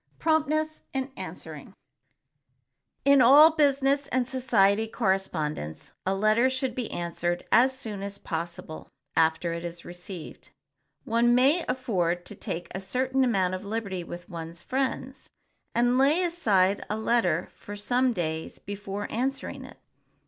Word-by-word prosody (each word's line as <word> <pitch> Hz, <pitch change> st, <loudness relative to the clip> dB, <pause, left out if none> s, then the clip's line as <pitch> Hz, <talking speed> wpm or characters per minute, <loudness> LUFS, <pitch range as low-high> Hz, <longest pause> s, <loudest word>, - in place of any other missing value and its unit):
[Sidenote: -, -, -39 dB
PROMPTNESS 310 Hz, 0 st, +1 dB
IN 265 Hz, +1 st, -2 dB
ANSWERING] -, -, -8 dB, 1.3 s
In 280 Hz, -1 st, +6 dB
all 290 Hz, +6 st, +8 dB
business 280 Hz, -2 st, +2 dB
and 255 Hz, -3 st, 0 dB
society 225 Hz, -5 st, +2 dB
correspondence 175 Hz, -, -2 dB
a 190 Hz, -, +2 dB
letter 215 Hz, +5 st, +3 dB
should 260 Hz, -1 st, -2 dB
be 245 Hz, -2 st, -4 dB
answered 175 Hz, 0 st, -3 dB
as 260 Hz, +2 st, +5 dB
soon 215 Hz, -6 st, -5 dB
as 200 Hz, 0 st, -5 dB
possible 165 Hz, -1 st, -6 dB, 0.3 s
after 165 Hz, +1 st, +2 dB
it 170 Hz, 0 st, -5 dB
is 175 Hz, 0 st, -7 dB
received. 175 Hz, -1 st, -9 dB, 0.5 s
One 235 Hz, +1 st, +3 dB
may 280 Hz, +7 st, +4 dB
afford 180 Hz, -9 st, -1 dB
to -, -, -9 dB
take 175 Hz, -3 st, -5 dB
a 190 Hz, -, -4 dB
certain 260 Hz, +6 st, 0 dB
amount 195 Hz, -7 st, +1 dB
of 185 Hz, +2 st, -4 dB
liberty 200 Hz, -4 st, -3 dB
with 175 Hz, +1 st, -9 dB
one's 170 Hz, -2 st, -8 dB
friends, 265 Hz, 0 st, -3 dB, 0.5 s
and 245 Hz, +2 st, +3 dB
lay 295 Hz, +7 st, +4 dB
aside 205 Hz, -, +2 dB
a 210 Hz, -, -1 dB
letter 220 Hz, -7 st, +1 dB
for 205 Hz, -, -9 dB
some 245 Hz, +5 st, +1 dB
days 160 Hz, -6 st, -3 dB
before 205 Hz, 0 st, -6 dB
answering 265 Hz, +4 st, -3 dB
it. -, -, -13 dB
220 Hz, 140 wpm, -27 LUFS, 180-260 Hz, 1.3 s, all